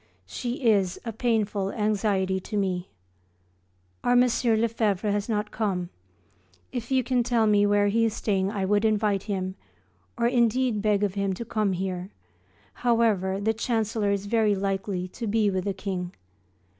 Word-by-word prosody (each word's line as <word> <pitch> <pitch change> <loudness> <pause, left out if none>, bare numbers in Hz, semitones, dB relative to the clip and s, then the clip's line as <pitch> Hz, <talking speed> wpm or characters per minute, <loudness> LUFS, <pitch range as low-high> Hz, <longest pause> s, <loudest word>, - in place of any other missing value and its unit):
She 245 - -5
is 195 -5 +2
a 230 - -4
painful 210 -4 0
anxiety 200 -3 0
to 210 +3 -5
me. 185 -2 -1 1.1
Our 245 - +3
M. 245 - +6
Lefevre 225 -4 +1
has 205 +2 -1
not 210 -1 -1
come; 185 -5 -2 0.8
if 235 -1 -5
you 260 -1 +2
can 250 0 +1
tell 235 -2 +2
me 205 -1 +4
where 205 0 +3
he 230 +3 +2
is 220 - -1
staying 195 -2 0
I 200 -2 -2
would 205 +2 +2
invite 210 -2 +2
him, 185 -2 -2 0.6
or 235 - +1
indeed 240 -1 +2
beg 210 -1 +2
of 200 -3 0
him 200 -1 -1
to 235 +5 -6
come 215 -4 0
here; 185 0 -3 0.6
however, 215 - +1
the 220 +2 +1
chancellor 220 -2 -1
is 200 0 -1
very 215 -1 +2
likely 195 -1 -2
to 230 +4 -6
be 210 -1 +2
with 185 -1 -2
the 200 - 0
King. 185 -2 -4
210 Hz, 160 wpm, -26 LUFS, 195-225 Hz, 1.1 s, M